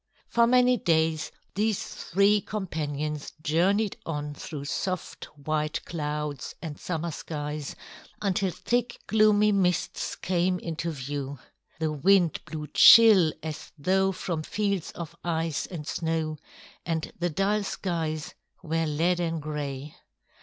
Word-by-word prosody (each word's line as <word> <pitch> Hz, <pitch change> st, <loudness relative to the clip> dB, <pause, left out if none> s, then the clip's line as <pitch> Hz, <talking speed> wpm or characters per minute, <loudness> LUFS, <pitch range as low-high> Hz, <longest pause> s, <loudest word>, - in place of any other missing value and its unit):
For 235 Hz, 0 st, +4 dB
many 250 Hz, 0 st, +5 dB
days 160 Hz, -4 st, +1 dB, 0.2 s
these 210 Hz, 0 st, 0 dB
three 200 Hz, +3 st, +2 dB
companions 150 Hz, -7 st, -4 dB
journeyed 185 Hz, +7 st, +1 dB
on 150 Hz, -2 st, -4 dB
through 145 Hz, -1 st, -7 dB
soft 185 Hz, +4 st, -3 dB
white 155 Hz, +2 st, -1 dB
clouds 150 Hz, -3 st, -4 dB
and 155 Hz, -4 st, -7 dB
summer 170 Hz, -1 st, -3 dB
skies 150 Hz, -1 st, -5 dB, 0.4 s
until 195 Hz, -1 st, +1 dB
thick, 240 Hz, +6 st, -1 dB
gloomy 210 Hz, -1 st, +4 dB
mists 185 Hz, -3 st, 0 dB
came 180 Hz, 0 st, 0 dB
into 170 Hz, -1 st, -4 dB
view. 140 Hz, -1 st, -4 dB, 0.4 s
The 160 Hz, -1 st, -1 dB
wind 175 Hz, +3 st, +3 dB
blew 155 Hz, -2 st, -5 dB
chill 210 Hz, -8 st, +9 dB
as 155 Hz, -1 st, -6 dB
though 190 Hz, +5 st, +2 dB
from 175 Hz, -3 st, -3 dB
fields 200 Hz, +1 st, -1 dB
of 165 Hz, -1 st, -7 dB
ice 165 Hz, -2 st, -1 dB
and 165 Hz, -5 st, -7 dB
snow, 160 Hz, -1 st, -2 dB, 0.4 s
and 160 Hz, -2 st, -2 dB
the 175 Hz, 0 st, +1 dB
dull 195 Hz, +6 st, +1 dB
skies 160 Hz, -6 st, -3 dB, 0.3 s
were 165 Hz, 0 st, 0 dB
leaden 165 Hz, +2 st, 0 dB
gray. 145 Hz, -1 st, -5 dB
165 Hz, 120 wpm, -27 LUFS, 150-190 Hz, 0.4 s, chill